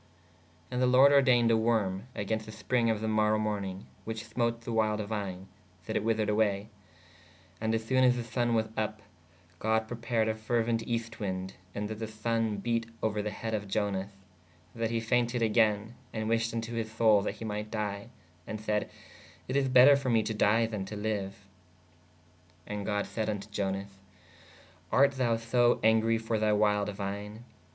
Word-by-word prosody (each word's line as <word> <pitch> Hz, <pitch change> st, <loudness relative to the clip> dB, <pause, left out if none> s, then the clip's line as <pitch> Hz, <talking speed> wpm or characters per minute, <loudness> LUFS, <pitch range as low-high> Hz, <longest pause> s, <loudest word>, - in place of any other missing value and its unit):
¶ -, -, -31 dB, 0.7 s
And 125 Hz, -, -1 dB
the 125 Hz, -, +4 dB
lorde 130 Hz, +3 st, +7 dB
ordeyned 125 Hz, -4 st, +5 dB
a -, -, +5 dB
worme 110 Hz, -3 st, +1 dB
agenst 110 Hz, +2 st, -2 dB
the 110 Hz, -, -9 dB
springe 115 Hz, +2 st, 0 dB
of 110 Hz, -1 st, 0 dB
[the] 110 Hz, -, -1 dB
morow 110 Hz, 0 st, +2 dB
mornīge 100 Hz, -3 st, -3 dB, 0.2 s
which 110 Hz, 0 st, -5 dB
smote 115 Hz, +1 st, -1 dB
the 120 Hz, -, -6 dB
wild 110 Hz, -1 st, +1 dB
vine/ 100 Hz, -3 st, -4 dB, 0.4 s
that -, -, -4 dB
it -, -, +1 dB
wethered 110 Hz, -1 st, +1 dB
awaye. 105 Hz, -1 st, +1 dB, 0.9 s
And 110 Hz, 0 st, 0 dB
assone 130 Hz, +4 st, +1 dB
as 125 Hz, -1 st, +5 dB
the 120 Hz, -, -3 dB
sonne 120 Hz, 0 st, 0 dB
was 110 Hz, -1 st, +2 dB
vpp/ 110 Hz, -1 st, -2 dB, 0.6 s
God 110 Hz, 0 st, +1 dB
prepared 115 Hz, -1 st, -1 dB
a 110 Hz, -, +1 dB
feruent 115 Hz, +1 st, 0 dB
eest 115 Hz, -1 st, -3 dB
winde: 95 Hz, -2 st, -3 dB, 0.2 s
so 100 Hz, -, -3 dB
that 110 Hz, +1 st, -5 dB
[the] 110 Hz, -, -3 dB
sonne 110 Hz, 0 st, -1 dB
bete 115 Hz, +2 st, -1 dB, 0.2 s
ouer 105 Hz, -1 st, 0 dB
the 105 Hz, -, -2 dB
heed 110 Hz, +2 st, -5 dB
of 105 Hz, -1 st, -2 dB
Ionas/ 100 Hz, -1 st, -1 dB, 0.6 s
that 115 Hz, -1 st, -2 dB
he 115 Hz, 0 st, 0 dB
fainted 120 Hz, +1 st, +1 dB
agayne 110 Hz, -1 st, +2 dB, 0.2 s
ād 110 Hz, 0 st, -2 dB
wished 115 Hz, 0 st, +1 dB
vn 115 Hz, 0 st, -2 dB
to 115 Hz, -, -6 dB
hys 115 Hz, -2 st, -3 dB
soule 110 Hz, -2 st, +4 dB
that 100 Hz, -, -3 dB
he 115 Hz, -, -7 dB
might 105 Hz, 0 st, -4 dB
dye/ 105 Hz, -1 st, -3 dB, 0.4 s
and 110 Hz, -, -4 dB
sayd/ 105 Hz, -1 st, -1 dB, 0.6 s
it 130 Hz, -, -3 dB
is 135 Hz, -1 st, +2 dB
better 130 Hz, +3 st, +8 dB
for 140 Hz, -2 st, -2 dB
me 115 Hz, -2 st, +3 dB
to 110 Hz, -, -2 dB
dye 110 Hz, +2 st, +3 dB
then 110 Hz, -3 st, -4 dB
to 105 Hz, -, -7 dB
liue. 105 Hz, -2 st, -2 dB
¶ -, -, -15 dB, 1.3 s
And 105 Hz, -1 st, -5 dB
god 105 Hz, -1 st, 0 dB
sayd 110 Hz, -1 st, -3 dB
vn 105 Hz, -2 st, -2 dB
to 100 Hz, -, -12 dB
Ionas/ 100 Hz, -1 st, -3 dB, 0.9 s
art 140 Hz, +1 st, +5 dB
thou 125 Hz, -4 st, +1 dB
so 120 Hz, +1 st, +3 dB
angre 110 Hz, +1 st, +3 dB
for 110 Hz, -1 st, -1 dB
thy 105 Hz, 0 st, +2 dB
wild 105 Hz, -1 st, +2 dB
vine? 105 Hz, +3 st, -5 dB
110 Hz, 190 wpm, -30 LUFS, 105-115 Hz, 1.3 s, better